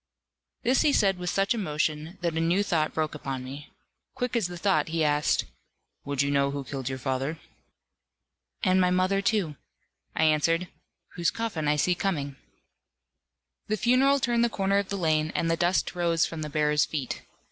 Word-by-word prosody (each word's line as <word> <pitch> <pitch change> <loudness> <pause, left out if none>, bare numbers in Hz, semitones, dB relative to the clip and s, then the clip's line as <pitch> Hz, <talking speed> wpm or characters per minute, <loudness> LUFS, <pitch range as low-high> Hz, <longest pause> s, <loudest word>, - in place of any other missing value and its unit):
This 255 +2 +3
he 295 - +3
said 195 -6 +3
with 180 0 -2
such 195 +2 +1
emotion, 155 -3 -2
that 170 -2 -1
a - - 0
new 170 +5 +2
thought 160 -6 0
broke 155 -1 -1
upon 135 -3 -5
me. 140 +3 -9 0.5
Quick 250 -1 -2
as 225 -7 +1
the 175 0 -7
thought, 170 -5 +2
he 160 0 0
asked, 150 0 +2 0.6
"Would 140 -1 0
you 140 - 0
know 140 0 +2
who 140 0 -4
killed 135 -1 -4
your 130 - -3
father?" 135 +4 -2 1.3
"And 185 -1 +4
my 180 - +3
mother, 185 +2 +2
too," 190 -8 0 0.6
I - - +2
answered, 165 +3 +2 0.5
"whose 170 -1 +2
coffin 205 -10 -3
I 150 - +3
see 180 +5 +2
coming." 150 -7 -2 1.3
The 215 - 0
funeral 265 +5 +4
turned 235 -2 +1
the 235 - +3
corner 195 -2 +1
of 200 - -3
the 200 - -2
lane, 155 -3 +1
and 165 - +1
the - - +3
dust 175 +2 +1
rose 170 -2 +2
from 165 -1 -6
the 150 - -4
bearers' 150 0 +2
feet. 140 -5 -4
165 Hz, 180 wpm, -27 LUFS, 150-195 Hz, 1.3 s, And